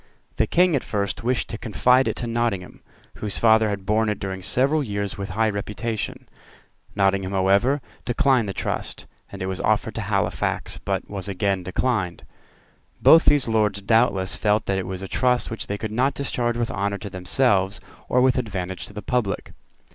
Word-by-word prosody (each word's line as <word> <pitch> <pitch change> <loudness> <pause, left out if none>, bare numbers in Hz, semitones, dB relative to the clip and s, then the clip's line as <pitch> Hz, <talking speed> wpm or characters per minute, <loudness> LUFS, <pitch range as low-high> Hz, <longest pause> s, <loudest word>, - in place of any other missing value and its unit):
The - - +2
King 180 -2 +3
at 135 - 0
first 100 0 -2
wished 125 +1 0
to 115 - -5
confide 125 +4 +3
it - - -1
to 120 - -4
Nottingham, 115 -6 -2 0.4
whose 105 -2 -2
father 110 -1 +4
had 100 -2 -4
borne 110 +2 +2
it 105 - -1
during 95 -1 -5
several 140 +10 +2
years 100 -4 -3
with 100 0 -5
high 110 +3 +1
reputation. 105 +2 -4 0.7
Nottingham, 95 -1 +1
however, 100 +9 +3 0.2
declined 125 -3 +2
the - - -1
trust; - - -3 0.3
and 100 -1 -6
it - - -1
was 95 -1 -3
offered - - +1
to - - -4
Halifax, - - -1
but - - -3
was 100 -1 -5
again 100 -1 0
declined. 95 -1 -1 0.8
Both 165 - +7
these 145 -4 +4
Lords 105 -3 +1
doubtless 100 -3 +2
felt 105 +1 +1
that 95 -1 0
it 95 - -4
was 95 0 -5
a - - -5
trust 125 +3 +1
which 115 - -5
they 100 - -3
could 110 0 -5
not 130 +5 +1
discharge 120 -4 -1
with 120 -1 -1
honour 100 0 -1
to 100 - -7
themselves 95 +1 +1 0.3
or 125 - +3
with 130 0 +3
advantage 95 -6 -4
to - - -14
the 105 0 -7
public. 110 -5 -2
105 Hz, 185 wpm, -23 LUFS, 95-120 Hz, 0.8 s, Both